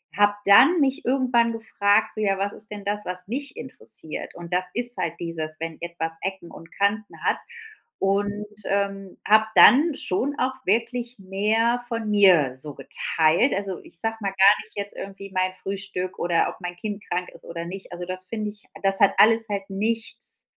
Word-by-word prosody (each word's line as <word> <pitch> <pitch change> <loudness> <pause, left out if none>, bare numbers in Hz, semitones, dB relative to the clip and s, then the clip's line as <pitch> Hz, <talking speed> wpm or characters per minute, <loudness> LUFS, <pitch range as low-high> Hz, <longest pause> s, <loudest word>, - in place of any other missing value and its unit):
habe 205 0 +3
dann 325 - +7
mich 270 -2 0
irgendwann 250 -3 +2
gefragt, 215 -2 +1
so: 215 - -4
„Ja, 195 -2 +1
was 200 +1 -2
ist 215 - -5
denn 205 -1 -7
das, 205 +1 -1
was 180 0 -3
mich 275 +5 -5
interessiert?“ 240 -10 -6
Und 175 0 -8
das 180 +1 +2
ist 240 0 +2
halt 165 - -2
dieses, 160 -2 -5
wenn 165 0 -5
etwas 170 -1 -3
Ecken 190 -2 -5
und 165 - -13
Kanten 205 +2 -2
hat, - - +2 0.6
und, 205 +2 0 0.2
ähm, 195 -1 -2
habe 215 +1 +5
dann 295 +4 +7
schon 275 +6 -1
auch 260 +1 0
wirklich 235 +3 -1
mehr 215 +5 +1
von 230 -3 -3
mir 175 -11 +5
so 145 +1 -5
geteilt. 165 - +2
Also, 195 -2 -4
ich 170 - -9
sage 225 +3 -1
mal 205 - -3
gar 195 +2 +7
nicht - - -22
jetzt 200 0 -5
irgendwie 195 0 -8
mein 185 0 0
Frühstück 195 -2 -4
oder 170 -1 +2
ob - - -10
mein 175 -1 -5
Kind 205 +2 -5
krank 180 +1 -2
ist - - -16
oder 170 0 -6
nicht. 190 +3 -8
Also, 175 0 -6
das 185 +1 -5
finde 215 +2 -3
ich 210 0 -17 0.2
das 195 0 +3
hat 200 -2 +5
alles 225 +1 +5
halt 200 -1 -3
nichts 225 +4 +1
200 Hz, 185 wpm, -24 LUFS, 185-225 Hz, 0.6 s, dann